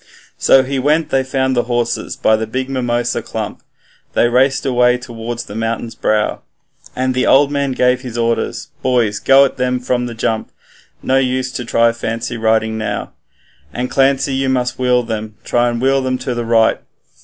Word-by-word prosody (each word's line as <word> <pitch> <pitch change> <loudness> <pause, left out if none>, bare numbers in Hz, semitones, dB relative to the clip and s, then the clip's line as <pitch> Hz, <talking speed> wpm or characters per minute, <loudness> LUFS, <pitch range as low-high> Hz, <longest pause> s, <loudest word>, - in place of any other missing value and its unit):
So 135 - +5
he 135 +1 -2
went 150 +4 +1
they 135 0 +1
found 130 0 0
the 120 -1 +1
horses 120 -1 -2
by 110 - +3
the 110 0 -3
big 130 +4 -3
mimosa 120 -2 -1
clump - - -5 0.5
They - - +3
raced 135 +2 +2
away 125 -1 +3
towards 120 -1 -6
the - - -10
mountain's 115 +1 -3
brow, 105 0 0 0.5
And 130 0 0
the 125 - 0
old 140 +1 +5
man 140 -2 -1
gave 125 0 +2
his 125 -3 -7
orders, 115 0 -1
'Boys, 120 -5 +1
go 135 +1 +6
at 135 - -4
them 125 0 0
from 125 0 -1
the 120 - -7
jump, 110 0 -2 0.5
No 130 +1 +2
use 130 0 -1
to 125 - -4
try 115 0 +3
for 115 - -14
fancy 115 +2 -3
riding 110 -1 +1
now. 110 - -3 0.6
And, 125 +8 -4
Clancy, 135 0 +2
you 135 0 0
must 125 -1 -1
wheel 125 -1 +2
them, 110 -2 -5
try 120 0 +1
and 120 -1 -3
wheel 135 +2 +2
them 130 0 -1
to 125 - -3
the 120 -1 -3
right. 115 -1 +3
125 Hz, 190 wpm, -17 LUFS, 115-130 Hz, 0.6 s, go